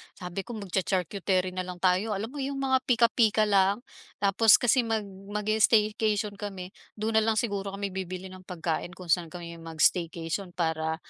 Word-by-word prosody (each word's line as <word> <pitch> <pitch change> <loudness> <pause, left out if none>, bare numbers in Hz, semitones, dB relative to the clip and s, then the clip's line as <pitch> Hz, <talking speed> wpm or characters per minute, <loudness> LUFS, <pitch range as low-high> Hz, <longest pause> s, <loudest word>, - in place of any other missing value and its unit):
sabi 180 0 -6
ko 235 +4 -6
mag-cha-charcuterie 185 -1 -1
nalang 180 -1 -6
tayo 190 +3 +2
alam 220 +5 -4
mo 290 - -7
yung 275 0 -3
mga 265 -1 +3
pika-pika 230 -3 +4
lang. 200 +2 +3 0.4
Tapos 215 +2 +6
kasi 245 -1 +2
mag 220 -2 0 0.3
mag-i-staycation 210 -1 +2
kami 190 -3 -6 0.2
do'n 220 +1 +1
nalang 220 0 +1
siguro 200 -4 -2
kami 200 0 -3
bibili 185 0 -5
ng 185 0 -13
pagkain 175 0 -3
kung 180 -3 -5
saan 175 -1 +2
kami 170 0 -9
mag-staycation 165 +2 -1
para 160 -2 0
195 Hz, 150 wpm, -28 LUFS, 180-215 Hz, 0.4 s, Tapos